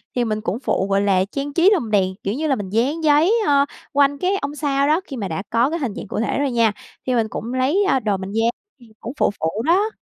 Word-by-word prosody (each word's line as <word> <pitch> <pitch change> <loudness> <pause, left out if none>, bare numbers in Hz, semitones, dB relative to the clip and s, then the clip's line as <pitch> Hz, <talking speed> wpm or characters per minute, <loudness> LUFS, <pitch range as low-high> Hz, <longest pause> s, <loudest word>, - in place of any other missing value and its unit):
Thì 245 - +1
mình 215 -1 -2
cũng 215 +2 -3
phụ, 195 -7 -1
gọi 195 0 +2
là, 190 -2 +2
trang 280 0 -4
trí 345 +4 +5
lồng 240 - -1
đèn, 190 -2 +1
kiểu 200 - -1
như 310 +5 -2
là, 275 - +2
mình 200 -4 -6
dán 265 - 0
giấy, 310 +7 +4
ờ, 280 -1 +4 0.3
quanh 285 0 +3
cái 370 +6 0
ông 285 +1 -4
sao 280 -1 0
đó, 315 +4 +2
khi 270 - -7
mà 200 -3 -3
đã 160 +3 -4
có 235 +4 +2
cái 335 +2 -3
hình 250 -9 -3
dạng - - -7
cụ - - -4
thể 235 - -1
rồi 285 -2 0
nha, 230 -3 +3 0.4
thì 255 - +1
mình 225 -2 +1
cũng 235 +4 -5
lấy, 280 +11 +2
ơ, 265 - +3
đồ 210 -4 -1
mình 190 +1 -6
dán, 225 +2 +1 0.3
thì 240 - -17
cũng 235 - -6
phụ - - +3
phụ 165 +8 -1
đó. 390 +6 +3
255 Hz, 275 wpm, -21 LUFS, 210-290 Hz, 0.4 s, trí